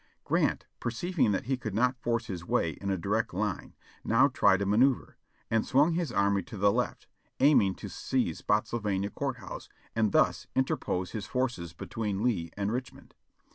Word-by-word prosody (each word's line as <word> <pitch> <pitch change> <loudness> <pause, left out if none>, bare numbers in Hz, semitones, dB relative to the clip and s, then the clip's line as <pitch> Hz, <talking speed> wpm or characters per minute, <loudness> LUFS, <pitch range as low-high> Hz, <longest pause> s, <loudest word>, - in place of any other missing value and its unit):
Grant, - - +1
perceiving 140 - 0
that 95 - 0
he 130 +1 0
could 110 -5 -5
not 125 +2 +1
force 115 0 0
his 90 -6 -5
way 85 -2 +1
in 100 +6 -6
a 95 - +1
direct 100 +2 -1
line, 100 -2 -3 0.3
now - - +4
tried 95 - +4
a - - -1
manoeuvre, 120 +6 +2 0.4
and 115 -1 +3
swung 145 +6 +3
his 165 -5 -1
army 100 -2 +2
to 105 - -10
the 100 +1 +4
left, - - -2 0.3
aiming 120 -10 +5
to - - -8
seize - - -1
Spottsylvania 105 -2 0
Court 135 -3 -3
House, 120 - -9 0.3
and 110 -2 +2
thus - - +2
interpose 95 -8 0
his 105 -4 -5
forces 115 -10 -2
between 105 -1 -3
Lee 100 -10 0
and 100 +1 -1
Richmond. 125 +1 -6
110 Hz, 175 wpm, -29 LUFS, 100-125 Hz, 0.4 s, aiming